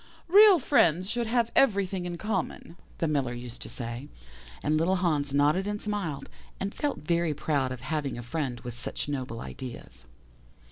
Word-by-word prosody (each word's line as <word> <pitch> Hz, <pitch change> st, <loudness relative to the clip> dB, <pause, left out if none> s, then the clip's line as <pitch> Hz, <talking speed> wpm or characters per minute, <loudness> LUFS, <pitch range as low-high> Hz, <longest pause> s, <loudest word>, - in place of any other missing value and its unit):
"'Real 405 Hz, +2 st, +8 dB
friends 185 Hz, -, +3 dB
should 235 Hz, +2 st, -1 dB
have 235 Hz, 0 st, +1 dB
everything 195 Hz, -7 st, +2 dB
in 175 Hz, -1 st, -4 dB
common,' 190 Hz, -4 st, -3 dB, 0.2 s
the 165 Hz, -, 0 dB
Miller 140 Hz, -5 st, 0 dB
used 120 Hz, 0 st, -8 dB
to -, -, -6 dB
say, 120 Hz, +2 st, -6 dB, 0.6 s
and 150 Hz, -, +2 dB
little 165 Hz, +5 st, +2 dB
Hans 155 Hz, -6 st, +1 dB
nodded 150 Hz, +7 st, +3 dB
and 205 Hz, 0 st, -2 dB
smiled, 190 Hz, -11 st, -3 dB, 0.3 s
and 195 Hz, +1 st, -3 dB
felt 290 Hz, -2 st, -2 dB
very 170 Hz, 0 st, +1 dB
proud 140 Hz, -3 st, 0 dB
of 130 Hz, -2 st, -6 dB
having 145 Hz, -2 st, -2 dB
a 120 Hz, -, -6 dB
friend 125 Hz, -2 st, -3 dB
with 120 Hz, -1 st, -7 dB
such 120 Hz, -, -3 dB
noble 130 Hz, -5 st, -4 dB
ideas. 90 Hz, -, -8 dB
155 Hz, 170 wpm, -28 LUFS, 130-195 Hz, 0.6 s, Real